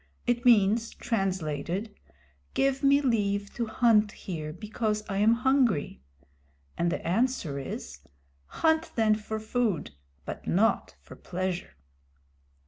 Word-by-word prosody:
It 240 0 0
means, 225 -1 +4
translated, 190 -1 -2 0.6
"Give 270 0 +1
me 280 0 +5
leave 200 -6 0
to 235 -2 -2
hunt 220 -2 +3
here 155 -5 -6
because 215 +3 -2
I 195 - -3
am 215 +2 +5
hungry." 245 - +1 0.7
And 170 0 0
the - - -3
answer 190 - 0
is, 135 - -7 0.5
"Hunt 320 0 +1
then 220 -2 +4
for 220 +1 -4
food, 215 - -1 0.3
but - - -7
not 215 +6 +1
for - - -12
pleasure." 180 - -4
215 Hz, 120 wpm, -28 LUFS, 185-240 Hz, 0.7 s, me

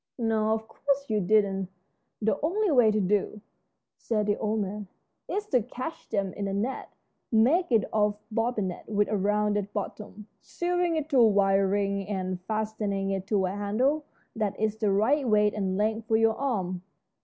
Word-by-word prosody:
"No, 220 -2 +1
of 220 0 -3
course 280 +3 -1
you 215 -1 +1
didn't. 195 -1 +2 0.5
The 220 +7 +1
only 380 +5 +1
way 245 -6 +5
to 215 0 +1
do," 205 +2 0 0.6
said 215 -3 -1
the 205 0 +1
old 215 +1 -1
man, 205 +1 -4 0.4
"is 415 +1 -2
to 250 - +3
catch 255 +8 -7
them 195 -3 -1
in 200 -1 -3
a 195 - -3
net. 235 +7 -3 0.4
Make 265 +10 +3
it 225 -3 +4
of 210 -1 +2
bobinet 215 -5 -2
with 205 -1 +1
a 215 - 0
rounded 205 0 0
bottom, 210 0 -6 0.2
sewing 350 -1 -1
it 310 -2 -2
to 275 -4 +3
a 230 - +7
wire 195 -1 +3
ring 200 0 -1
and 185 -3 -3
fastening 210 -2 -2
it 195 -1 -3
to 200 -3 +1
a 185 - -1
handle 235 +10 0 0.3
that 210 -3 -2
is 215 0 0
the 220 -1 0
right 250 +8 +2
weight 210 -1 +3
and 190 -2 -1
length 220 +2 -1
for 220 - +3
your 225 0 +3
arm." 190 -10 -2
215 Hz, 180 wpm, -27 LUFS, 200-230 Hz, 0.6 s, a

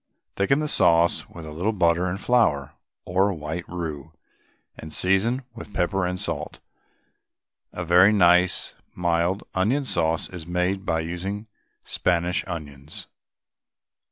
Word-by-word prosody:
Thicken 135 +10 +2
the 155 - -1
sauce 85 - +3
with 85 -2 -10
a 75 - -8
little 90 +8 -1
butter 85 -2 +2
and 95 +2 -3
flour, 105 - +2 0.3
or 95 +3 +2
white 80 +1 -5
roux, 80 -6 -6 0.6
and 80 - -10
season 100 - +2
with 105 -3 -11
pepper 90 +1 0
and 90 0 -3
salt. 85 -7 -4 1.1
A 90 - -5
very 90 +4 +6
nice 90 -3 +4 0.2
mild 85 +2 0
onion 120 +10 +1
sauce 80 -7 0
is 85 -3 -9
made 90 +3 -1
by 80 0 +1
using 95 +6 -4 0.4
Spanish 90 +1 0
onions. 75 -4 -7
90 Hz, 130 wpm, -24 LUFS, 85-95 Hz, 1.1 s, very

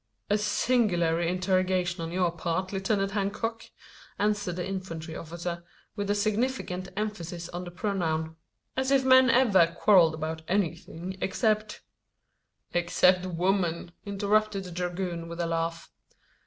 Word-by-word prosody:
"A 210 - +5
singular 205 -6 +2
interrogation 185 0 +1
on 165 0 -4
your 180 -1 +1
part, 170 +3 -2
Lieutenant 195 0 0
Hancock!" 210 +3 -2 0.5
answered 205 -4 0
the 180 - -3
infantry 165 -4 -5
officer, 170 +1 -5 0.3
with 205 -1 -3
a 205 - +2
significant 210 -3 -1
emphasis 175 -5 -4
on 175 +1 -5
the - - -6
pronoun. 165 -4 -2 0.4
"As 265 0 0
if 270 -1 +3
men 260 0 +7
ever 195 -10 +4
quarrelled 170 -5 +5
about 160 +1 -4
anything 180 -1 -2
except 215 +1 0 0.5
" - - -43
"Except 180 +1 +3
women," 175 -1 0
interrupted 205 0 +1
the 180 - -8
dragoon 175 -1 -3
with 170 +1 -7
a 170 - +1
laugh. 165 0 -2
185 Hz, 130 wpm, -28 LUFS, 170-205 Hz, 0.5 s, men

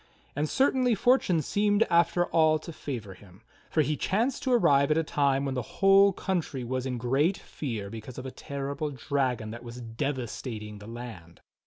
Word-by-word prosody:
And 150 +2 -1
certainly 260 -3 +2
fortune 220 -8 +3
seemed 205 +6 +2
after 170 -1 +3
all 155 -2 +3
to 160 +2 -9
favor 115 -11 -6
him, 95 -1 -18 0.3
for 155 - +2
he 150 +1 0
chanced 230 - 0
to 260 - -1
arrive 140 - +4
at 155 - +3
a 165 - +2
time 140 -2 +1
when 135 - -1
the 125 - -1
whole 195 - +5
country 170 -8 -2
was 130 +2 -2
in 125 -1 -2
great 135 +10 +1
fear 115 -9 -5
because 115 +2 -8
of 130 - -6
a 130 - -5
terrible 140 +3 -4
dragon 130 -5 -1
that 120 +2 -8
was 120 +1 -8
devastating 115 -3 -4
the 105 - -11
land. 115 -8 -9
140 Hz, 180 wpm, -28 LUFS, 120-170 Hz, 0.3 s, whole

